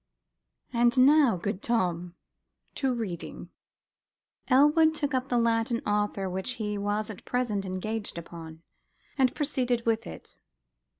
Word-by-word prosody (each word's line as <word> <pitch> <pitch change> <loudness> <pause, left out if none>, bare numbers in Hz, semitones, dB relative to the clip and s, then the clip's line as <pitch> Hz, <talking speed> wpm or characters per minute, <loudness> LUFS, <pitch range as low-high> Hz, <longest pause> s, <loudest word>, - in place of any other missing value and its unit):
And 240 +2 +3
now, 280 -8 +5
good 200 +2 -3
Tom, 180 -6 -1 0.6
to 270 -2 0
reading." 215 -9 -5 1.0
Elwood 300 +4 +5
took 290 -2 -1
up 260 0 -1
the 245 - +1
Latin 230 0 +1
author 205 -2 0
which 190 +6 -2
he 210 -4 -3
was 205 +1 -2
at 205 - -11
present 215 -6 -1
engaged 205 +2 -3
upon, 165 -1 -9 0.5
and 260 -2 +2
proceeded 250 -5 -1
with 230 0 0
it. - - -11
225 Hz, 125 wpm, -28 LUFS, 195-255 Hz, 1.0 s, now